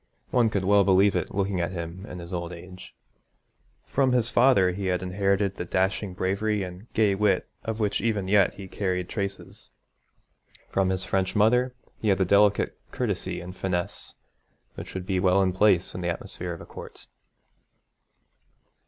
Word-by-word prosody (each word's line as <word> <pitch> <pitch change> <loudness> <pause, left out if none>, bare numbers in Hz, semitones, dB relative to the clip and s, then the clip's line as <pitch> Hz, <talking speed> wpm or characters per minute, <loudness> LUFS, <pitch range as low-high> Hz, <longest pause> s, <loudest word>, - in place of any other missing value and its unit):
One 120 -3 +3
could 100 -3 -1
well 100 +1 +5
believe 95 +1 +4
it 90 - -1
looking 95 -2 -1
at 85 +2 -2
him 85 +3 -6
in 90 - -8
his 85 +1 -8
old 85 -1 -3
age. 90 +2 -11 0.9
From 130 -2 +1
his 120 -2 +1
father 120 -8 +5
he 95 +1 -4
had 90 0 0
inherited 100 +1 +1
the - - -3
dashing 95 +2 -1
bravery 100 +3 0
and 90 +5 -9
gay 105 -3 +3
wit 95 -1 +1 0.2
of 110 0 -4
which 105 -2 0
even 105 -5 0
yet 100 -1 +3
he 95 -1 -9
carried 90 -2 -2
traces. 100 -2 -5 1.0
From 95 -1 +1
his 95 0 -1
French 95 0 -1
mother 125 +4 +3 0.2
he 110 - -3
had 100 -2 +4
the 95 - +2
delicate 100 +2 +3
courtesy - - -3
and 90 +1 -9
finesse 95 0 -3 0.6
which - - -9
would 95 -1 -4
be 95 -1 0
well 90 +1 +3
in 95 -1 +2
place 95 -2 +3
in 90 - -5
the 90 - -1
atmosphere 85 +1 -5
of 85 - -9
a - - -9
court. - - -11
95 Hz, 170 wpm, -26 LUFS, 90-105 Hz, 1.0 s, well